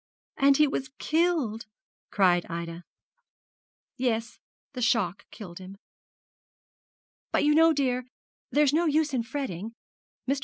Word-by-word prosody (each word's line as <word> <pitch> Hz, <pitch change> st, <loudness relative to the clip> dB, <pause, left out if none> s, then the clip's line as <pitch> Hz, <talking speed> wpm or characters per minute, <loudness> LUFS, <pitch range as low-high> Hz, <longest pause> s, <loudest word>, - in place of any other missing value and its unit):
'And 275 Hz, -1 st, +5 dB
he 300 Hz, -, +6 dB
was 270 Hz, -2 st, -3 dB
killed!' 310 Hz, -10 st, 0 dB, 0.4 s
cried 180 Hz, -3 st, +3 dB
Ida. 170 Hz, 0 st, -6 dB, 1.1 s
'Yes; 235 Hz, -3 st, -2 dB, 0.3 s
the 250 Hz, -, -5 dB
shock 225 Hz, -6 st, +1 dB
killed 180 Hz, -5 st, -10 dB
him. 190 Hz, +1 st, -11 dB, 1.5 s
But -, -, +2 dB
you 300 Hz, 0 st, +4 dB
know, 325 Hz, +1 st, +6 dB
dear, 255 Hz, -4 st, 0 dB, 0.4 s
there's 290 Hz, -1 st, +3 dB
no 335 Hz, +2 st, +2 dB
use 305 Hz, -1 st, +1 dB
in 250 Hz, -, +1 dB
fretting. 230 Hz, -5 st, -5 dB, 0.5 s
Mr. 275 Hz, +1 st, +1 dB
250 Hz, 120 wpm, -27 LUFS, 200-295 Hz, 1.5 s, he